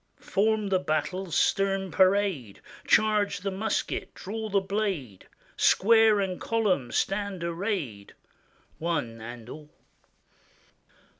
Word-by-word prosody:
Form 215 0 0
the 190 -1 +2
battle's 175 +1 -2
stern 195 0 +1
parade, 185 - +2 0.3
Charge 210 -3 +3
the 195 0 -2
musket, 210 +3 -3
draw 220 +3 -5
the 200 -1 +3
blade; 190 - -3 0.3
Square 220 0 +4
and 185 -2 -3
column 200 - 0
stand 195 -3 -1
arrayed, 170 - -3 0.6
One 145 -9 -2
and 120 0 -9
all. 150 +3 -10
190 Hz, 100 wpm, -27 LUFS, 155-205 Hz, 0.6 s, Square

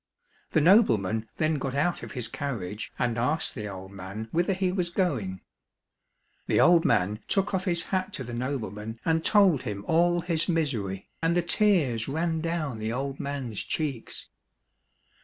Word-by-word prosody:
The 160 - +2
nobleman 115 - +4
then 155 -1 +1
got 135 0 -3
out 160 +5 +1
of - - -8
his 125 -3 -4
carriage 110 -6 -4
and 120 -2 0
asked 145 +7 0
the 105 -4 -5
old 95 -1 -8
man 100 +3 -7
whither 175 +3 +2
he 185 -1 0
was 180 -2 -1
going. 125 - -1 1.1
The - - +3
old 175 -1 +6
man" 105 -2 +2
took 200 +1 +1
off 185 0 0
his 170 -3 +1
hat 190 +1 -1
to 175 - -4
the 120 0 -7
nobleman 115 -4 -4
and 160 0 +2
told 195 -9 +5
him 100 -1 -5
all 175 +1 +3
his 170 0 0
misery, 120 - -1
and 165 +1 +2
the 175 - +2
tears 160 - +2
ran 160 +3 -1
down 155 -8 -2
the 110 +1 -2
old 135 +3 -3
man's 135 -7 -3
cheeks. 140 -7 -4
140 Hz, 165 wpm, -27 LUFS, 110-170 Hz, 1.1 s, old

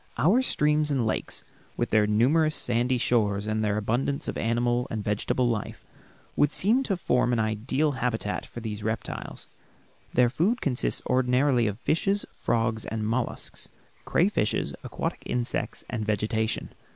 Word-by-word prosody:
Our 205 - +4
streams 150 -9 +2
and 135 -5 +1
lakes, 110 - -2 0.3
with - - -1
their 105 -1 +4
numerous 145 +9 +3
sandy 125 +1 +1
shores, 105 -4 +1
and 110 0 -1
their 105 -1 +1
abundance 125 +7 -1
of - - -3
animal 120 +1 0
and 110 -2 -3
vegetable 105 +4 0
life, 110 -4 -3 0.5
would 145 - +3
seem 225 - +3
to 195 -5 0
form 125 -7 +1
an 120 - +2
ideal 115 +7 0
habitat 120 -5 -2
for 120 - -9
these 110 -2 -5
reptiles. 110 +1 -4 0.6
Their 120 -1 +3
food 190 - +1
consists 130 - 0
ordinarily 125 -1 +3
of 105 +1 -3
fishes, 195 +5 +1
frogs, 110 -1 0
and 110 -1 -3
mollusks, 120 +2 -3 0.3
crayfishes, - - +1
aquatic - - -4
insects, 120 -1 -2
and 115 -2 -3
vegetation. 110 +1 -1
120 Hz, 145 wpm, -27 LUFS, 110-140 Hz, 0.6 s, Our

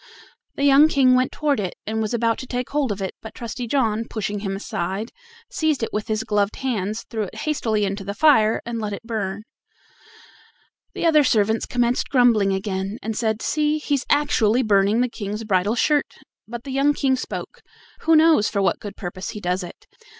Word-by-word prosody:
The 280 - -2
young 285 +2 +7
King 270 -4 +4
went 255 0 +2
toward 290 -5 0
it 185 -3 -3
and 220 +1 -2
was 215 - -2
about 230 -1 0
to 260 - -7
take 250 0 -4
hold 285 -5 0
of 200 -1 -4
it, 190 - -3
but 220 - -10
Trusty 235 0 -5
John, 225 -4 0
pushing 205 -2 -3
him 195 -1 -3
aside, 195 +2 -4 0.4
seized 310 -6 0
it - - -3
with 210 +1 -2
his 215 -1 -1
gloved 210 -2 0
hands, 220 -5 -3
threw 225 -2 -2
it - - -11
hastily 225 -9 0
into 195 0 -3
the 200 +1 -5
fire, 250 -8 +4
and 235 -1 -4
let 210 -2 -3
it 200 - -7
burn 210 -3 -4 1.5
The - - -2
other 310 -3 +5
servants 220 -3 +1
commenced 245 0 0
grumbling 235 -7 +4
again, 190 +1 -3
and 225 0 -3
said: 220 -1 -1
"See, 300 0 +1
he's 290 -3 -2
actually 260 -5 +2
burning 205 +1 +3
the 250 - +2
King's 210 -2 -5
bridal 200 +1 +1
shirt." 295 +4 +1 0.3
But 235 +1 -7
the 275 - -7
young 280 +2 +2
King 265 -2 +2
spoke: 255 - -6 0.4
"Who 325 - +3
knows 310 -8 +5
for 200 - -2
what 195 - +1
good 205 - -8
purpose 185 0 -6
he - - -5
does 180 0 -1
it? 175 - -10
225 Hz, 195 wpm, -22 LUFS, 205-260 Hz, 1.5 s, young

